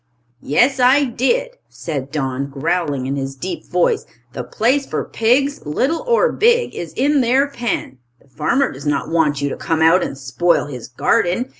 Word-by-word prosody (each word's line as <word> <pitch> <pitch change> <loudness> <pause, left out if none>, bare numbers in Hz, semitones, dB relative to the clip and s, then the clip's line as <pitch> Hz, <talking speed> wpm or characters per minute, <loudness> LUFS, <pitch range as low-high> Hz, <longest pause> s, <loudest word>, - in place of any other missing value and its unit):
"Yes, 255 - +2
I 260 +3 +5
did," 485 - -1
said 140 -5 -5
Don, 140 -2 -2
growling 145 -1 -1
in 135 +2 -2
his 135 0 -4
deep 185 +7 -6
voice. 180 -1 +1 0.3
"The 125 - -4
place 245 - +1
for - - -3
pigs, 270 +5 +1
little 265 - -1
or 480 +1 +3
big, 475 +2 +2
is 165 -2 -6
in 280 +2 +2
their 260 +4 +3
pen. 240 - -4 0.2
The - - -27
farmer 155 - 0
does - - -8
not 145 -1 -1
want 150 -4 +1
you 140 - 0
to - - -4
come 160 -1 -1
out 165 +3 +5
and 135 - -5
spoil 135 +7 +1
his 130 -5 -8
garden. 175 - 0
175 Hz, 175 wpm, -19 LUFS, -, 0.3 s, I